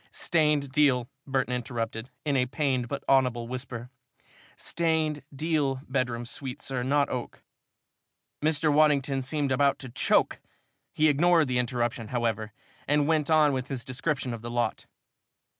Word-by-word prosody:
"Stained 150 -4 +1
deal," 135 -4 +3 0.2
Burton 130 -2 0
interrupted, 115 -1 -4 0.2
in 145 -2 +1
a 125 -1 +2
pained 130 -3 0
but 140 +3 -5
audible 125 -3 +2
whisper. 125 -1 -6 0.7
"Stained 160 -3 0
deal 145 -2 0
bedroom 125 -3 -1
suite, 130 +2 -6
sir 130 -2 -3
not 140 +3 +2
oak." 125 -1 -5 1.0
Mr. 155 0 +2
Waddington 145 -3 +3
seemed 140 +1 -1
about 140 +1 +3
to 130 - -8
choke. 120 - +2 0.5
He 155 - +3
ignored 165 +1 +4
the 125 -1 +1
interruption, 120 -1 -1
however, 115 -2 -2 0.4
and 145 0 +3
went 155 -2 +2
on 155 -2 +5
with 130 0 -2
his 130 -4 -4
description 135 -1 -2
of 115 - -6
the 120 - -6
lot. 120 0 -2
135 Hz, 140 wpm, -27 LUFS, 125-150 Hz, 1.0 s, on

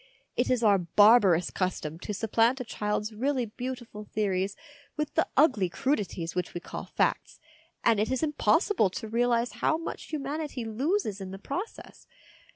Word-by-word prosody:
It - - +1
is 250 -2 +1
our 205 -3 +5
barbarous 190 -1 +5
custom 165 -4 -2
to 210 - -5
supplant 225 +5 +2
a - - -2
child's 210 -1 -2
really 255 +3 0
beautiful 240 -1 -6
theories 200 -2 -1 0.4
with 300 -1 -2
the - - +2
ugly 255 - +4
crudities 190 - -2
which 180 0 -3
we - - -2
call - - -7
facts, - - -1 0.4
and 225 -3 +4
it 215 - +1
is 260 +3 0
impossible 295 - +2
to 220 +5 -6
realise 235 +1 +1
how 315 - +3
much 330 - -6
humanity 290 -3 -4
loses 230 - -1
in 190 - -6
the 190 - -7
process. 355 - -7
225 Hz, 160 wpm, -28 LUFS, 200-260 Hz, 0.4 s, our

